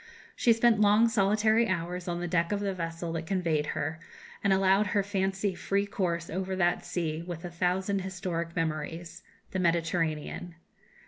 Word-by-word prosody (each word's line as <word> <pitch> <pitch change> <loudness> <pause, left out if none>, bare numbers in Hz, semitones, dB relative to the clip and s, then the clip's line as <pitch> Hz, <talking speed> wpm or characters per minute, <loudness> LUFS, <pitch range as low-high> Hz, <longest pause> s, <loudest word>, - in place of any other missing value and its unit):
She 240 - +3
spent 225 -1 +4
long, 210 +2 +6
solitary 215 +2 +3
hours 180 -1 -2
on 175 0 -2
the 175 - -2
deck 170 0 +1
of 205 - 0
the 200 -1 -1
vessel 165 -1 -4
that 165 -1 -4
conveyed 165 -5 0
her, 155 +2 -2 0.4
and 200 - +3
allowed 195 +2 +4
her 200 +1 +1
fancy 195 0 -1
free 200 +2 0
course 170 -4 -2
over 190 +2 -3
that 175 -1 +1
sea 160 -2 -2
with 170 0 -6
a 175 - -5
thousand 185 +3 0
historic 180 -3 -4
memories 165 +2 -3 0.3
the 190 - -2
Mediterranean. 170 -1 -1
180 Hz, 165 wpm, -29 LUFS, 170-195 Hz, 0.4 s, long